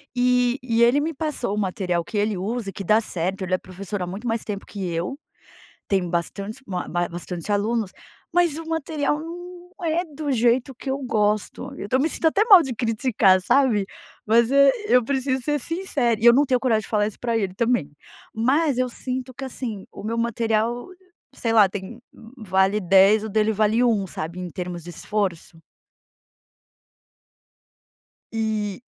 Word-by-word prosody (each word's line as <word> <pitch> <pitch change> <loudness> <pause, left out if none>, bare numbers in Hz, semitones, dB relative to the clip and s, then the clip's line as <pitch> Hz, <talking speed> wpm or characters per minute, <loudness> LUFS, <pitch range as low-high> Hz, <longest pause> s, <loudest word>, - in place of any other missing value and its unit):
E 250 +1 +2
e 235 -2 +2
ele 245 +5 +5
me 320 +2 -2
passou 270 -8 -2
o - - -5
material 185 -3 -1
que 210 - -5
ele 205 -1 0
usa 215 +2 -3
e - - -8
que 195 - -6
dá 215 +4 +4
certo, 190 -2 -3
ele 185 0 -3
é - - +4
professor 190 +1 -7
há 180 - -2
muito 205 +7 -6
mais 225 0 -1
tempo 200 -2 -5
que 195 -4 -5
eu, 175 +12 -3 0.7
tem 190 -3 0
bastante 200 +7 -3 0.5
bastante 175 +2 -5
alunos, 210 0 0 0.4
mas 340 -3 +2
o 330 - -6
material 305 -2 -1
não 340 +2 -7 0.4
é 330 +2 +1
do 300 -2 -5
jeito 245 +2 +2
que 265 +2 -6
eu 270 - -1
gosto, 215 -5 -1
eu - - -6
estou 255 +5 +1
me 310 - +2
sentindo 325 - -1
até 405 +7 +2
mal 390 -7 +8
de 260 -4 -4
criticar, 220 -5 +2
sabe? 230 -3 +3 0.4
Mas 230 +2 +4 0.4
eu 250 -2 +5
preciso 265 -1 -1
ser 295 +1 0
sincera 275 - -1
e - - -3
eu 235 - +9
não 285 +4 +4
tenho 255 -2 +1
coragem 225 -4 +2
de - - -11
falar 210 -1 +1
isso 215 - -7
para 235 -2 0
ele 195 -4 -1
também, 235 -10 0 0.4
mas 265 +5 +2
eu 255 0 +1
sinto 255 +1 -5
que 270 +2 -7
assim 235 -6 -5
o - - -9
meu 230 +2 -3
material, 230 +2 0 0.4
sei 230 -1 -2
lá 210 -4 +6
tem 205 +4 -7 0.4
vale 195 -2 +1
10 195 +3 +5
o - - -4
dele 215 +1 +1
vale 215 +3 +2
1 215 -5 +2
sabe 165 +3 -6
em 180 - -5
termos 175 -1 -5
de 175 - -9
esforço. 175 -3 -3 2.7
E, 215 -2 -2
225 Hz, 175 wpm, -23 LUFS, 195-255 Hz, 2.7 s, eu